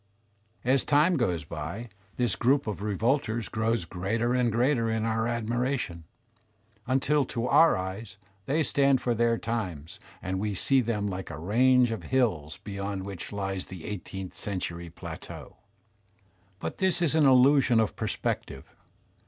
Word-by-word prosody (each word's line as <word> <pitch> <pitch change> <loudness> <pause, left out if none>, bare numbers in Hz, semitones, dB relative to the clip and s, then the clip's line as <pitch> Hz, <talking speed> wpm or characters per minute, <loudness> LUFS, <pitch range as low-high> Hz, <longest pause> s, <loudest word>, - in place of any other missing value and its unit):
As 130 +1 +3
time 150 +5 +4
goes 90 - 0
by, 80 +11 -6 0.3
this 120 -5 +2
group 135 +4 +2
of 105 -3 -4
revolters 110 +2 0
grows 110 -3 0
greater 110 +8 -1
and 125 -2 +2
greater 120 0 +2
in 110 0 0
our 110 0 0
admiration, 120 - -2 0.8
until 135 +3 +2
to 120 -1 -3
our 165 +5 +5
eyes 95 +4 -6 0.3
they 155 +4 +2
stand 140 -2 +3
for 120 - 0
their 115 0 +2
times 90 -10 -4 0.2
and 95 +1 -3
we 105 0 -2
see 135 +7 +3
them 105 -3 -1
hke 95 +1 -5
a - - -6
range 120 - +3
of 115 - -3
hills 100 - 0
beyond 100 -1 -4
which 100 -4 -7
lies 95 -2 -3
the 90 -4 -9
eighteenth 95 -2 -6
century 85 -4 -4
plateau. 80 - -9 1.0
But - - -5
this 190 -2 +1
is 155 - +2
an 155 -3 +5
illusion 130 -2 +5
of 110 - 0
per - - -3
spective. 65 - -3
115 Hz, 150 wpm, -28 LUFS, 95-125 Hz, 1.0 s, our